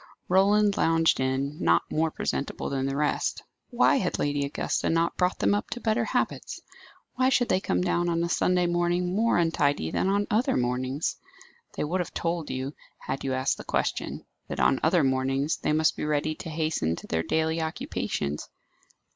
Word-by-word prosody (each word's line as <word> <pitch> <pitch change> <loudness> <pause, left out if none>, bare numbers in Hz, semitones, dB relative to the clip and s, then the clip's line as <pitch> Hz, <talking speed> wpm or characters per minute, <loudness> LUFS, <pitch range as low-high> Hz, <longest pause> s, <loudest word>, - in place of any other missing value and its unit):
Roland 200 +2 +4
lounged 165 0 +3
in, 135 +3 -1
not 85 0 +4
more 160 +1 +1
presentable 140 -2 -3
than 135 -1 -1
the 135 - -2
rest. 150 +1 -1 0.3
Why - - +4
had - - -1
Lady 145 0 0
Augusta 140 - -1
not 165 +1 +1
brought 180 0 +1
them - - +2
up 205 +3 -1
to 245 - -4
better 220 -1 +1
habits? - - -2 0.5
Why 255 +1 +2
should 245 -2 +2
they 185 - +3
come 90 - 0
down 175 - +1
on 170 0 0
a - - 0
Sunday 180 +1 +2
morning 175 +1 0
more 230 +2 +2
untidy 145 - +1
than - - 0
on 200 +1 +1
other 220 +4 +2
mornings? 130 +4 -1 0.6
They - - -2
would 170 +5 -1
have 180 - -4
told 165 -2 -2
you, 130 +2 -3 0.2
had 135 +1 -5
you 130 -1 -1
asked 130 +1 0
the - - -8
question, - - -2 0.2
that - - -5
on 65 +1 +3
other 165 0 +3
mornings 135 +2 +1
they - - -1
must 155 +1 +2
be - - -5
ready 150 +1 0
to 165 - -8
hasten 155 - -1
to - - -10
their 80 - -1
daily 160 - 0
occupations. 75 - -3
160 Hz, 185 wpm, -27 LUFS, 135-175 Hz, 0.6 s, Roland